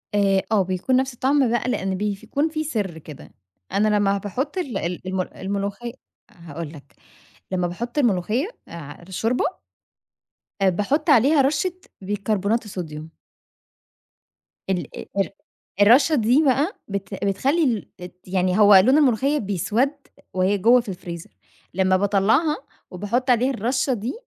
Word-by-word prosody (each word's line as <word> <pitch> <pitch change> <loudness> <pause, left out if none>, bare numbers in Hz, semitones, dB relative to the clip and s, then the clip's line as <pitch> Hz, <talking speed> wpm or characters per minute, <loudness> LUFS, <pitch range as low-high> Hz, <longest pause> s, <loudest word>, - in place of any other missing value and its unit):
آآ، 195 -1 +3
آه، 215 -2 +4
بيكون 185 +7 -1
نفس 260 0 +1
الطَّعم 265 +1 +2
بقى 240 +1 0
لأن 190 -5 -1
بيف 205 0 -3
كون 295 +3 0
فيه 310 0 -3
سر 205 - -3
كده، 150 -2 -12 0.4
أنا 210 +2 +2
لما 205 -1 +2
باحط 250 - -4
ال 275 - -2
ال 180 0 -4
المل 185 -1 -3
الملوخي 200 +4 -4 0.4
هاقول 165 -2 -8
لك، 140 -3 -15 0.6
لما 180 -1 0
باحط 235 +10 -5
الملوخية 230 - +1 0.2
على 165 +1 -10
الشوربة 225 +6 0 1.2
باحط 210 - +1
عليها 280 +3 +5
رشّة 290 +7 +1 0.3
بيكربونات 205 +3 -1
الصوديوم. 160 -5 -7 1.5
ال 180 -6 -1 0.3
ال 195 - +1 0.5
الرشّة 265 +9 +6
دي 250 +5 +3
بقى 280 +7 +2
بت 200 -1 -4
بتخلّي 255 - +1
الت 180 0 -11
يعني 185 +1 +1
هو 205 -1 +8
لون 240 +10 +6
الملوخية 275 +1 +3
بيسوَد 215 - 0 0.4
وهي 185 +2 +2
جوا 235 +6 +5
في 225 - -10
الفريزر، 175 -3 -7 0.4
لما 185 +1 +2
باطلّعها 210 - +2 0.3
وباحط 220 +8 -2
عليها 250 +2 +3
الرشّة 255 +4 0
دي 230 +3 -3
205 Hz, 135 wpm, -23 LUFS, 185-255 Hz, 1.5 s, هو